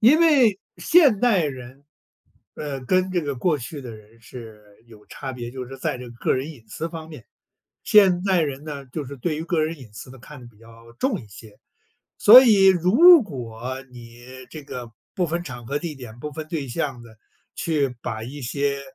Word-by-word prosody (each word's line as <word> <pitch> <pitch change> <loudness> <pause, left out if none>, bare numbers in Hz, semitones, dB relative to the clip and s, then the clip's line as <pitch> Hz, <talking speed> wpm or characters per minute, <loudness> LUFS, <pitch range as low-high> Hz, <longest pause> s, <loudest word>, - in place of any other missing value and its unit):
因 260 +9 +6
为 260 - +4 0.2
现 290 - +4
代 220 -9 +3
人， 130 0 -8 0.7
呃， 140 -3 -5
跟 185 +5 +1
这 180 -2 0
个 145 -3 -4
过 150 +4 0
去 140 +4 -8
的 120 -3 -9
人 110 +2 -16
是 110 -2 -12 0.2
有 110 -2 -17
差 135 -2 -7
别， 120 -1 -7
就 125 0 -7
是 135 +1 -10
在 130 - -3
这 125 -1 -9
个 120 - -13
个 - - +1
人 135 +4 -3
隐 125 -8 -15
私 165 +8 -5
方 160 -1 -9
面。 150 -8 -12 0.6
现 190 -4 +5
代 190 -3 +2
人 140 0 -4
呢， 140 -3 -7
就 140 +3 -6
是 140 +2 -9
对 150 +4 -3
于 160 - -5
个 170 -2 0
人 165 +1 -4
隐 115 -5 -14
私 120 +4 -10
的 135 - -13
看 135 +2 -13
得 120 - -13
比 110 -3 -19
较 115 +1 -17
重 210 - -2
一 110 - -14
些。 105 +1 -15 0.6
所 245 +5 +10
以 205 -5 +5
如 230 - +7
果 130 - -7
你 120 0 -14 0.3
这 155 -2 -9
个 125 -4 -8 0.2
不 180 -2 0
分 170 +2 -3
场 125 -6 -9
合 145 +3 -2
地 165 -1 -6
点、 120 -3 -11
不 150 - -5
分 155 +1 -7
对 150 -6 -4
象 130 -3 -4
的， 110 -2 -16 0.4
去 145 -6 -1
把 110 -1 -5
一 140 +5 -8
些 140 +2 -2
140 Hz, 220 characters per minute, -23 LUFS, 120-170 Hz, 0.7 s, 所